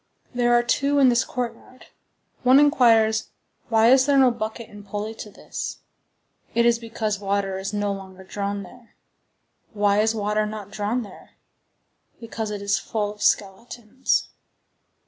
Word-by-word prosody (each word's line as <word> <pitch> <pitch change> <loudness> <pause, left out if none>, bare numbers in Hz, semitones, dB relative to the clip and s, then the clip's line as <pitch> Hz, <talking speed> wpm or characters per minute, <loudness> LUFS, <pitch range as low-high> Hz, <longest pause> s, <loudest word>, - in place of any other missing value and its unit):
There 240 -1 +1
are 240 - +2
two 280 +4 +1
in 270 -2 +6
this 240 -1 +3
courtyard. 250 +1 -6 0.6
One 255 +2 +6
inquires, 230 -7 +4 0.4
Why 225 +1 +5
is 265 +1 +5
there 285 -1 +4
no 260 -2 +6
bucket 225 0 -5
and 205 -1 -13
pulley 205 +2 -5
to 220 - -9
this? - - -7 0.8
It 235 0 +3
is 235 -1 +3
because 225 -3 -3
water 195 -1 -1
is 195 +1 -4
no 205 -1 -1
longer 190 -1 -10
drawn 200 +1 -4
there. 235 +5 -16 0.8
Why 205 -1 +2
is 220 +1 +2
water 210 0 0
not 210 -2 -8
drawn 215 +4 -2
there? 200 -3 -15 0.8
Because 225 -1 -5
it 205 -1 -5
is 200 0 +1
full 210 -2 -3
of 210 - -18
skeletons. 220 +5 -1
220 Hz, 150 wpm, -23 LUFS, 205-240 Hz, 0.8 s, in